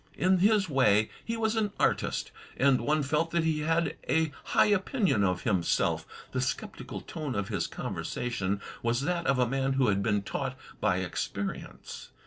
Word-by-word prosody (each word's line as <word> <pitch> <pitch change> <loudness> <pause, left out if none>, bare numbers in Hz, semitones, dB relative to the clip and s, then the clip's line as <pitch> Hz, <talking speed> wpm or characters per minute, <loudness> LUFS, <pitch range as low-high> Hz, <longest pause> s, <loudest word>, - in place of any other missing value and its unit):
In 185 0 +3
his 205 0 +4
way, 110 -7 +3
he 230 0 -3
was 220 0 +1
an 210 -2 0
artist, - - +1 0.3
and 135 -1 +4
one 150 0 +1
felt 150 +4 +1
that 170 0 +1
he 160 -1 +1
had 160 0 0
a 160 -1 +2
high - - +4
opinion 205 - +2
of 90 -2 0
himself. 95 -7 +1 0.2
The - - -1
sceptical - - -4
tone 150 -6 -5
of 100 -1 -2
his - - -1
conversation 100 -5 -3 0.2
was 120 +2 +1
that 170 +3 -1
of 135 - +3
a 125 - +3
man 135 +2 0
who 135 -4 +3
had 100 -1 +1
been 100 0 +1
taught - - -3 0.2
by - - +2
experience. 100 0 -5
140 Hz, 170 wpm, -29 LUFS, 110-170 Hz, 0.3 s, his